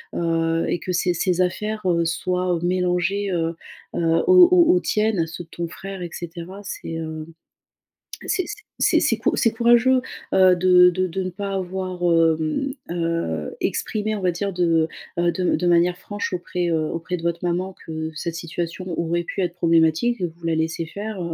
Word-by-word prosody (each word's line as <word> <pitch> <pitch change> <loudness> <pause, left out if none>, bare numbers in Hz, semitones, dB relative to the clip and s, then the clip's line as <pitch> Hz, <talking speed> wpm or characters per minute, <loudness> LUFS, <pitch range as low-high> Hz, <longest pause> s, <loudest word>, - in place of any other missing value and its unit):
heu, 165 -1 0
et - - +1
que 180 - -5
ses 175 0 +1
ses 180 +1 +1
affaires, 215 +4 -1
heu, 170 -1 +2
soient, 180 +2 0
heu, - - -2
mélangées, 185 +2 0
heu, 165 -1 -1 0.4
heu, 165 0 +2
aux 365 -1 +8
aux 350 -1 +6
aux 360 - +3
tiennes, 210 - +1
ceux 165 +2 -7
de 165 - -35
ton 170 -1 -4
frère 195 +2 -7
et 175 - -5
cetera 175 +3 -8
c'est, 195 - -6
hem. 160 -1 -5 1.0
C'est 370 - 0
c 415 - -5 0.2
c'est - - +4
-c'est - - +2
cou - - +1
c'est 230 - +3
courageux, 240 +3 +4 0.3
heu, 185 -1 +6
de 180 0 +6
de 185 +1 -1
de 190 +3 -3
ne 185 - -3
pas 195 +2 -4
avoir 185 -1 -4 0.4
hem, 265 - -1 0.2
heu, 165 - -2
exprimé 215 0 -1
on 210 - -4
va 185 -1 +2
dire 195 +3 -3
de, 165 -3 +2 0.3
heu, 175 0 +2
de 180 0 +1
de 180 - -2
manière 175 +1 +3
franche 205 -2 -5
auprès, 180 -1 -2
heu, 160 -1 +1
auprès 170 +2 -3
de 165 - -10
votre 170 0 -1
maman 180 +2 -1
que 160 0 -5
cette 165 +1 -4
situation 170 +2 -5
aurait 170 +1 0
pu - - -4
être 175 -2 -1
problématique. 165 +7 +2
Et 180 - +1
vous 170 +1 -18
la 165 - +1
laissez 160 +1 -1
faire, 205 +3 -6
175 Hz, 190 wpm, -22 LUFS, 165-195 Hz, 1.0 s, aux